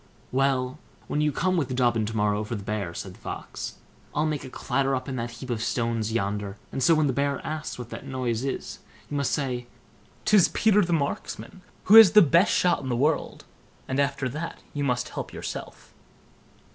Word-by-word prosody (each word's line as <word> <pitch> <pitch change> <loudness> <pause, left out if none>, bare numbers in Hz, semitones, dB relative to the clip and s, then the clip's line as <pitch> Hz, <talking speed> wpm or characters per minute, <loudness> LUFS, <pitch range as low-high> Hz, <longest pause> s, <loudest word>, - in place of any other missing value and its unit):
"Well, 130 +1 +1 0.3
when 150 - 0
you 150 0 +2
come 185 +5 0
with 135 -6 -1
Dobbin 120 -4 +2
to 110 0 -4
morrow 105 0 +1
for 110 +2 -4
the 100 - -6
bear", 100 -5 -3
said - - -6
the - - -18
Fox, - - -6 0.4
"I'll 150 - +2
make 155 -2 -2
a 130 - -8
clatter 135 +2 0
up 130 - -4
in 135 - -3
that 120 0 -3
heap 120 +2 -7
of 115 -2 -2
stones 115 -2 -1
yonder, 105 -2 -2
and 135 - -3
so 165 +6 +5
when 155 -1 +3
the 135 - +1
bear 140 +1 0
asks 155 0 -4
what 125 -1 -8
that - - -7
noise 125 -3 -2
is, 135 - -4 0.3
you 145 - -1
must 140 -2 0
say 125 -4 -2 0.6
'tis 210 -5 +6
Peter 210 -2 +3
the 175 - -2
Marksman, 165 +4 -3 0.2
who 215 +4 +8
is 220 -6 +10
the 210 - +9
best 170 +5 +4
shot 175 -3 +2
in 130 - -5
the 120 - +1
world; 150 +4 0 0.4
and 130 +1 -1
after 140 -1 0
that 155 +6 -5 0.2
you 145 - -2
must 125 -2 0
help - - -6
yourself." - - -7
135 Hz, 205 wpm, -26 LUFS, 120-150 Hz, 0.6 s, is